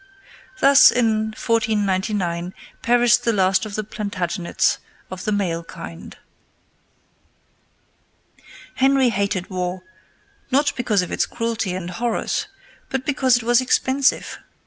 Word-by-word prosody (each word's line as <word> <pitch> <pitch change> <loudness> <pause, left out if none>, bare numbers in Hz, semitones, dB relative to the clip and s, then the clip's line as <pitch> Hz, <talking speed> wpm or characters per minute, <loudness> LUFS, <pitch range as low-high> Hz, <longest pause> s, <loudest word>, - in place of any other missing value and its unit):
Thus, 275 0 +8
in 220 -3 +1
1499, 195 -5 -1 0.3
perished 240 0 +3
the 230 - +2
last 190 -1 +2
of 205 - -7
the 215 - -2
Plantagenets 200 -4 -2 0.3
of 185 0 -7
the 215 - 0
male 175 -5 -1
kind. 165 -1 -10 2.6
Henry 270 -1 +3
hated 200 -3 -2
war, 180 0 -3 0.7
not 280 +2 +1
because 215 -6 +1
of 180 - -7
its - - 0
cruelty 230 -5 -3
and 180 -1 -5
horrors, 235 - -2 0.4
but 265 -1 -3
because 265 -4 +2
it 245 - -5
was 240 +2 +3
expensive. 260 +1 +1
215 Hz, 115 wpm, -21 LUFS, 185-245 Hz, 2.6 s, Thus